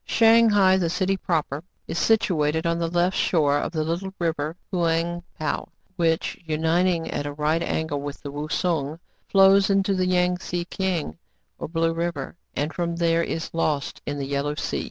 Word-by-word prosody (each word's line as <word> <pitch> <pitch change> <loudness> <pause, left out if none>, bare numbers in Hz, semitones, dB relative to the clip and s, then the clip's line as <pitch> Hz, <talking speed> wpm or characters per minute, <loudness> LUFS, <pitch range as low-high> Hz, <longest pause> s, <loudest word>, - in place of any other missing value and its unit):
Shang 230 0 +5
hai, 190 -2 +5
the 175 -3 0
city 190 +2 0
proper, 160 -5 -2 0.2
is 170 - -2
situated 160 -7 +2
on 170 0 +1
the 170 - 0
left 175 +2 +1
shore 145 -4 +2
of - - -3
the 160 -3 -1
little 170 +5 -3
River 160 -2 -1 0.2
Houang 170 0 0 0.2
Pou, 155 - -2 0.3
which, 165 -3 0
unit 165 +3 +1
ing 170 -3 -1
at 145 - -2
a 145 - -4
right 155 +3 0
angle 160 -4 -2
with 145 0 -6
the 140 - -5
Wousung, 150 0 -1 0.3
flows 195 0 +5
into 195 0 +2
the 185 -1 +1
Yang 180 0 +2
Tze 175 -1 -4
Kiang, 170 - -2 0.4
or - - -4
Blue 165 +1 0
River, 165 -4 -3 0.2
and 150 +2 -1
from 170 -2 -2
there 170 -1 +2
is 165 -1 -3
lost 150 -4 -1
in 145 - -2
the 140 - -3
Yellow 140 +1 -1
Sea. 145 - -2
165 Hz, 180 wpm, -24 LUFS, 155-180 Hz, 0.4 s, Shang